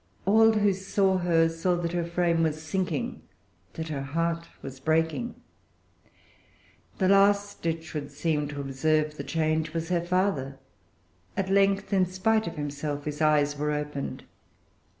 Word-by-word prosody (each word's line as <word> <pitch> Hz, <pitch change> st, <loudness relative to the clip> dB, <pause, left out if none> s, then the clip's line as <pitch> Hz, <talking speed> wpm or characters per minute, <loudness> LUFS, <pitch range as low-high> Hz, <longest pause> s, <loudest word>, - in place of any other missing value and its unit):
All 225 Hz, +3 st, +6 dB
who 205 Hz, -2 st, +3 dB
saw 195 Hz, 0 st, +1 dB
her 165 Hz, -2 st, +3 dB
saw 165 Hz, +2 st, 0 dB
that 170 Hz, -1 st, -2 dB
her 175 Hz, -1 st, -1 dB
frame 170 Hz, -1 st, +1 dB
was 155 Hz, -1 st, 0 dB
sinking, 190 Hz, +10 st, -2 dB, 0.5 s
that 160 Hz, 0 st, -5 dB
her 145 Hz, -3 st, -3 dB
heart 165 Hz, +4 st, -2 dB, 0.2 s
was 135 Hz, -1 st, -8 dB
breaking. 160 Hz, -, 0 dB, 1.6 s
The 190 Hz, -, +2 dB
last, 200 Hz, +1 st, +3 dB
it 165 Hz, 0 st, -1 dB
should 150 Hz, -3 st, -6 dB
seem, 150 Hz, -3 st, -1 dB
to 145 Hz, -1 st, -5 dB
observe 150 Hz, +3 st, 0 dB
the 140 Hz, -, -4 dB
change 155 Hz, +2 st, -1 dB
was 165 Hz, 0 st, -2 dB
her 175 Hz, -2 st, +1 dB
father. 175 Hz, -7 st, 0 dB, 0.8 s
At 190 Hz, -1 st, -1 dB
length, 195 Hz, +1 st, +2 dB
in 185 Hz, -2 st, +3 dB
spite 215 Hz, +4 st, +1 dB
of 170 Hz, -, -5 dB
himself, 145 Hz, 0 st, -4 dB
his 150 Hz, 0 st, -4 dB
eyes 150 Hz, -1 st, +3 dB
were 150 Hz, +1 st, -1 dB
opened. 150 Hz, -1 st, -4 dB
165 Hz, 150 wpm, -27 LUFS, 150-190 Hz, 1.6 s, All